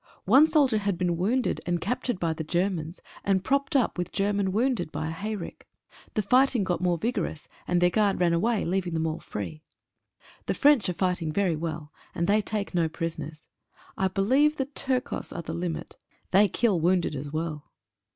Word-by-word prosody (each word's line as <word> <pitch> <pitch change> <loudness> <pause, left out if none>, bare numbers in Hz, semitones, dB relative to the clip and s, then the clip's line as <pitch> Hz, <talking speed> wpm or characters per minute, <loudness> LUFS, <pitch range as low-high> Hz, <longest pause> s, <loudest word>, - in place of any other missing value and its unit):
One 270 +10 +7
soldier 285 -8 +3
had 200 -3 -1
been 175 -1 0
wounded 225 +9 0
and 175 0 +1
captured 240 +2 -2
by 165 -3 0
the 160 - -5
Germans, 175 0 -2 0.2
and 190 -2 +1
propped 280 +4 0
up 245 -8 +2
with 175 - -2
German 200 -1 0
wounded 220 -6 0
by 155 +2 -3
a - - -3
hayrick. 200 +2 -6 0.5
The 215 - +1
fighting 250 +1 +3
got 180 -2 -1
more 175 -1 +2
vigorous, 195 -6 -3 0.2
and 180 - +2
their 175 0 +4
guard 205 -1 +2
ran 175 -2 +3
away, 215 +6 +1
leaving 180 -1 -1
them 160 0 0
all 160 0 -2
free. 155 +10 -6 0.9
The - - 0
French 285 -9 +4
are - - -1
fighting 180 -3 -1
very 185 -1 +1
well, 155 -1 -5 0.2
and 170 -2 0
they 210 +3 +3
take 205 -1 -3
no 170 -2 +1
prison 165 0 -4
ers. 155 0 -12 0.5
I 190 - +1
believe 255 +11 +3
the 270 - 0
Turcos 265 -1 -3
are 170 - -4
the 160 - -5
limit 170 -1 -4 0.2
— - - -39
they 200 +3 +6
kill 205 -2 +1
wounded 175 -1 +1
as 145 +1 -5
well. 155 -1 -4
185 Hz, 190 wpm, -27 LUFS, 165-215 Hz, 0.9 s, One